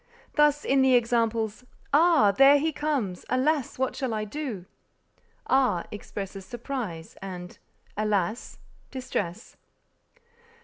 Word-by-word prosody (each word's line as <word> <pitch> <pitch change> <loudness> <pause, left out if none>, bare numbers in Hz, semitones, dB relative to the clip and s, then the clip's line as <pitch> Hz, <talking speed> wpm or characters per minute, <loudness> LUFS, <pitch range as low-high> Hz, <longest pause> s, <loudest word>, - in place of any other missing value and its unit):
Thus 295 -1 +3
in 270 0 +3
the 260 -1 +5
examples, 230 -2 +1 0.3
"Ah! 310 -8 +5
there 275 +7 +7
he 315 +3 0
comes; 275 -12 -2
alas! 270 +2 0
what 260 -1 -1
shall 260 -4 -2
I 215 0 -2
do?" 225 -6 -5 0.8
ah, 255 -10 +2
expresses 200 -1 -7
surprise, 235 - -6
and 180 -2 -8 0.4
alas, 210 +1 -1 0.3
distress. 235 -6 -5
240 Hz, 105 wpm, -27 LUFS, 205-275 Hz, 0.8 s, there